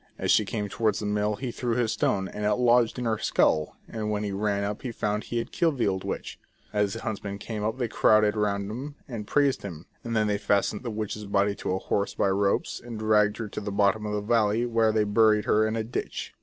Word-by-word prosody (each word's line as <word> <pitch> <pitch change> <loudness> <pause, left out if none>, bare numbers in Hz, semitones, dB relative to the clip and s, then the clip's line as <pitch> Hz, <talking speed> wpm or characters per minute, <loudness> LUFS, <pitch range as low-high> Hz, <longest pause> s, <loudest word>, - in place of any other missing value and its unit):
As - - 0
she 105 - +4
came 105 0 -3
towards 110 +2 0
the 105 - -4
mill 105 0 0
he 125 +2 -4
threw 120 -1 -2
his 120 -3 +1
stone, 95 -1 0
and 105 - -6
it 105 0 +2
lodged 120 -1 +3
in 125 - -3
her 110 -2 0
skull, 75 -1 +1
and 110 -2 -4
when 105 0 -1
he 100 - -2
ran 100 0 0
up 105 +1 -3
he 125 - -4
found 105 -2 -2
he 120 - -3
had 115 - -3
killed 165 -5 +1
the 120 - +1
old 95 -1 -1
witch. - - -5 0.3
As 105 -1 +1
the 115 - -6
hunts 110 -2 -3
men 100 -1 -4
came 105 0 -5
up 110 +3 -1
they 125 -2 -1
crowded 110 -1 +4
round 100 -1 -1
him, 140 +6 -6
and 110 -5 -6
praised 140 -2 +2
him; 85 -5 -8 0.2
and 115 -1 -3
then 110 -1 +3
they 105 -1 0
fastened 100 0 +1
the 125 - -4
witch's 105 -1 -4
body 100 0 +2
to 90 - -2
a - - 0
horse 100 +1 -1
by 100 - +2
ropes, 100 +1 0
and 120 -2 -7
dragged 105 -1 +3
her 115 - -4
to - - -5
the 100 0 -4
bottom 100 +2 +2
of 105 - -3
the 105 - -1
valley, 110 +1 +2
where 115 -2 +2
they 110 -1 +2
buried 105 0 +3
her 110 +1 +3
in 110 - -2
a 110 - -1
ditch. 115 - -5
105 Hz, 255 wpm, -27 LUFS, 100-115 Hz, 0.3 s, she